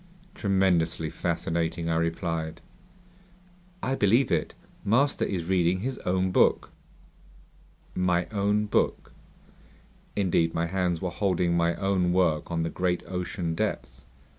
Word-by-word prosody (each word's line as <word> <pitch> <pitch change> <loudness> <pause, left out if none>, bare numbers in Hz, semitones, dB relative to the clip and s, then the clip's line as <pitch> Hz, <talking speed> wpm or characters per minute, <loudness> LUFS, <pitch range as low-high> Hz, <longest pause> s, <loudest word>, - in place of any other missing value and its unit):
"Tremendously 90 - +1
fascinating," 85 0 -2
I 80 - +1
replied. 80 -1 -2 1.2
"I 130 - 0
believe 115 +2 +3
it. - - 0 0.3
Master 135 +7 +2
is 90 -4 -3
reading 90 0 +2
his 130 +3 -3
own 95 +1 0
book!" - - +3 1.2
"My 90 -1 +1
own 105 0 +1
book?" 105 - 0 1.0
Indeed, 85 -4 +1
my 85 - +1
hands 90 -1 -1
were 90 - -1
holding 90 -2 +1
my 85 0 +2
own 95 -1 +1
work 90 -4 +1
on 85 -1 -1
the 80 - -2
great 90 -1 -1
ocean 90 -2 -3
depths. 60 -6 -4
90 Hz, 120 wpm, -27 LUFS, 85-95 Hz, 1.2 s, believe